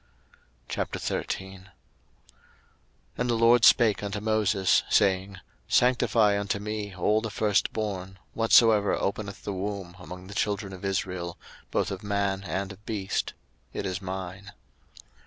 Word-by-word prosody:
02:013:001 95 Hz, -1 st, -4 dB, 1.5 s
And 125 Hz, 0 st, 0 dB
the 120 Hz, -, +2 dB
LORD 115 Hz, +1 st, +5 dB
spake 115 Hz, -4 st, +6 dB
unto 105 Hz, 0 st, -3 dB
Moses, 105 Hz, -3 st, +2 dB
saying, 95 Hz, -1 st, +2 dB
02:013:002 90 Hz, -, -11 dB, 0.3 s
Sanctify 115 Hz, -4 st, +3 dB
unto 100 Hz, 0 st, -1 dB
me 105 Hz, -1 st, -5 dB
all 105 Hz, +4 st, +2 dB
the 115 Hz, -, -3 dB
firstborn, 100 Hz, -2 st, -1 dB, 0.2 s
whatsoever 115 Hz, -2 st, +5 dB
openeth 100 Hz, 0 st, -3 dB
the 100 Hz, -, -3 dB
womb 95 Hz, -2 st, -4 dB
among 90 Hz, 0 st, -9 dB
the 100 Hz, -, -9 dB
children 100 Hz, -1 st, -1 dB
of 95 Hz, -, -10 dB
Israel, 90 Hz, -3 st, -2 dB, 0.3 s
both -, -, 0 dB
of 95 Hz, -, -5 dB
man 100 Hz, -1 st, -1 dB
and 95 Hz, +4 st, -2 dB
of 100 Hz, +1 st, -13 dB
beast: 100 Hz, -4 st, -2 dB, 0.4 s
it -, -, -3 dB
is 95 Hz, 0 st, -3 dB
mine. 95 Hz, +2 st, -6 dB
100 Hz, 130 wpm, -27 LUFS, 95-105 Hz, 1.5 s, spake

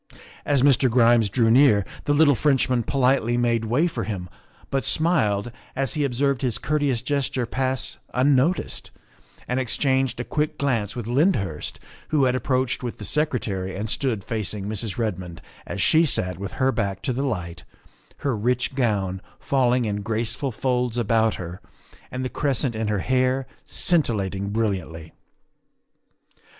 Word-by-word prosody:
As 140 Hz, -3 st, +2 dB
Mr. 135 Hz, -2 st, +4 dB
Grimes 115 Hz, -2 st, +4 dB
drew 115 Hz, +1 st, +2 dB
near 115 Hz, -6 st, +5 dB, 0.2 s
the 145 Hz, -, +2 dB
little 145 Hz, -1 st, +5 dB
French 135 Hz, +1 st, +2 dB
man 125 Hz, -2 st, +1 dB
politely 125 Hz, -1 st, +1 dB
made 120 Hz, -2 st, +1 dB
way 125 Hz, +9 st, +2 dB
for 170 Hz, -, -2 dB
him, 95 Hz, -5 st, -5 dB, 0.4 s
but 135 Hz, -1 st, 0 dB
smiled 120 Hz, -, +2 dB, 0.2 s
as 135 Hz, -3 st, 0 dB
he 150 Hz, -, 0 dB
ob 135 Hz, -3 st, -1 dB
served 140 Hz, 0 st, +1 dB
his 125 Hz, -4 st, 0 dB
courteous 145 Hz, -5 st, 0 dB
gesture 135 Hz, -2 st, -1 dB
pass 130 Hz, +2 st, -2 dB
unnoticed 140 Hz, +6 st, +1 dB, 0.6 s
and 125 Hz, +1 st, 0 dB
ex 130 Hz, -3 st, -1 dB
changed 135 Hz, -3 st, +1 dB
a -, -, -1 dB
quick 150 Hz, +4 st, -2 dB
glance 115 Hz, -8 st, -1 dB
with 120 Hz, -3 st, -4 dB
Lyndhurst, 120 Hz, -, 0 dB, 0.3 s
who 150 Hz, -3 st, +2 dB
had 125 Hz, 0 st, +2 dB
ap 130 Hz, -, -2 dB
proached 130 Hz, -2 st, 0 dB
with 120 Hz, -2 st, -5 dB
the 105 Hz, -, -7 dB
Secretary 105 Hz, -11 st, -1 dB
and 105 Hz, +3 st, -3 dB
stood 120 Hz, -8 st, -1 dB
facing 105 Hz, -2 st, -3 dB
Mrs. 105 Hz, 0 st, -3 dB
Red 110 Hz, -6 st, -1 dB
mond 90 Hz, -2 st, -9 dB, 0.3 s
as -, -, -5 dB
she 160 Hz, +1 st, +4 dB
sat 90 Hz, -, 0 dB
with 100 Hz, -2 st, -5 dB
her 130 Hz, 0 st, +2 dB
back 100 Hz, -5 st, -2 dB
to 130 Hz, -, 0 dB
the 130 Hz, -, -2 dB
light, 90 Hz, -11 st, -3 dB, 0.6 s
her 135 Hz, -4 st, +1 dB
rich 125 Hz, +5 st, 0 dB
gown 100 Hz, -8 st, 0 dB, 0.2 s
falling 125 Hz, -2 st, +2 dB
in 105 Hz, -1 st, -2 dB
graceful 115 Hz, +5 st, -2 dB
folds 125 Hz, 0 st, -1 dB
about 115 Hz, -1 st, +2 dB
her 90 Hz, 0 st, -7 dB, 0.5 s
and 130 Hz, 0 st, -4 dB
the -, -, -2 dB
cres 140 Hz, -4 st, 0 dB
cent 130 Hz, -5 st, 0 dB
in 110 Hz, 0 st, -2 dB
her 105 Hz, -2 st, 0 dB
hair 130 Hz, +1 st, +1 dB, 0.2 s
scintillating 100 Hz, -, 0 dB
brilliantly. 95 Hz, -7 st, -3 dB
120 Hz, 165 wpm, -24 LUFS, 105-135 Hz, 0.6 s, near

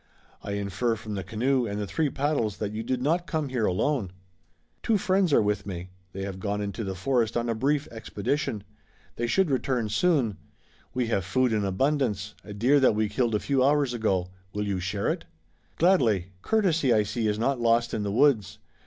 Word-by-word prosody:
I 100 Hz, -, -5 dB
infer 100 Hz, +4 st, -1 dB
from 110 Hz, 0 st, -7 dB
the 95 Hz, -2 st, -3 dB
canoe 125 Hz, +4 st, 0 dB
and 100 Hz, 0 st, -3 dB
the 105 Hz, -, -2 dB
three 150 Hz, -, 0 dB
paddles 135 Hz, -7 st, -1 dB
that 105 Hz, -2 st, -3 dB
you 110 Hz, +1 st, -4 dB
did 125 Hz, +2 st, -2 dB
not 170 Hz, +5 st, +1 dB
come 155 Hz, -3 st, -1 dB
here 125 Hz, -4 st, 0 dB
alone." 105 Hz, +3 st, 0 dB, 0.7 s
"Two 225 Hz, -2 st, +2 dB
friends 190 Hz, -3 st, +2 dB
are 125 Hz, -, +5 dB
with 105 Hz, 0 st, -1 dB
me. 90 Hz, -1 st, -6 dB, 0.2 s
They 95 Hz, +2 st, -5 dB
have 95 Hz, -1 st, -5 dB
gone 100 Hz, +1 st, -2 dB
into 100 Hz, +1 st, -3 dB
the 95 Hz, -2 st, -4 dB
forest 115 Hz, +3 st, 0 dB
on 120 Hz, 0 st, -1 dB
a 115 Hz, -, +1 dB
brief 140 Hz, +6 st, 0 dB
expedition. 110 Hz, 0 st, -2 dB, 0.5 s
They 120 Hz, -, -1 dB
should 185 Hz, +5 st, +2 dB
return 125 Hz, -3 st, 0 dB
soon. 130 Hz, -, +2 dB, 0.6 s
We 125 Hz, -1 st, +1 dB
have 100 Hz, -5 st, +1 dB
food 120 Hz, +6 st, +1 dB
in 105 Hz, -2 st, +1 dB
abundance, 105 Hz, -1 st, 0 dB
a 105 Hz, -, -10 dB
deer 125 Hz, +8 st, +3 dB
that 130 Hz, -5 st, +4 dB
we 110 Hz, -1 st, +1 dB
killed 115 Hz, +1 st, 0 dB
a -, -, +2 dB
few 135 Hz, +1 st, +1 dB
hours 140 Hz, -2 st, +3 dB
ago. 95 Hz, -6 st, 0 dB, 0.2 s
Will 105 Hz, 0 st, -2 dB
you 100 Hz, -2 st, -1 dB
share 95 Hz, +3 st, -2 dB
it?" -, -, -1 dB, 0.5 s
"Gladly. 115 Hz, -, +3 dB
Courtesy, 170 Hz, -, +2 dB
I 110 Hz, -2 st, +4 dB
see, 110 Hz, +2 st, -2 dB
is 105 Hz, 0 st, 0 dB
not 120 Hz, +3 st, 0 dB
lost 115 Hz, 0 st, +2 dB
in 110 Hz, -, -1 dB
the 100 Hz, -1 st, -2 dB
woods. 110 Hz, -4 st, +3 dB
115 Hz, 200 wpm, -27 LUFS, 100-135 Hz, 0.7 s, are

